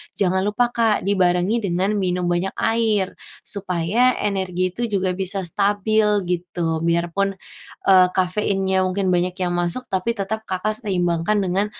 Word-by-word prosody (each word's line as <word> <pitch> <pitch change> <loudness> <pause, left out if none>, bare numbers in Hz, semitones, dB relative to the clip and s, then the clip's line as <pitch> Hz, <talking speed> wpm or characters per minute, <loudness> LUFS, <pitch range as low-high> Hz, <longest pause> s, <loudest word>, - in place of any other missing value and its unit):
jangan 190 0 +1
lupa 240 +4 +1
Kak, 230 -3 +1
dibarengi 185 +2 +2
dengan 190 -1 0
minum 180 -1 -1
banyak 175 +2 -1
air. 220 -4 0 0.2
Supaya 200 +6 +1
energi 185 -3 -1
itu 235 +6 -3
juga 190 -4 0
bisa 195 0 0
stabil, 205 +4 +1 0.2
gitu. 175 -2 -2
Biar 170 0 +1
pun, 195 +2 -1 0.5
eee, 185 -2 +7
kafeinnya 190 0 +1
mungkin 185 0 0
banyak 180 0 0
yang 180 -2 -1
masuk, 175 +7 0
tapi 190 +5 -1
tetap 220 +1 -4
Kakak 215 +3 -2
seimbangkan 180 +1 0
dengan, 190 +2 0
190 Hz, 140 wpm, -21 LUFS, 180-205 Hz, 0.5 s, eee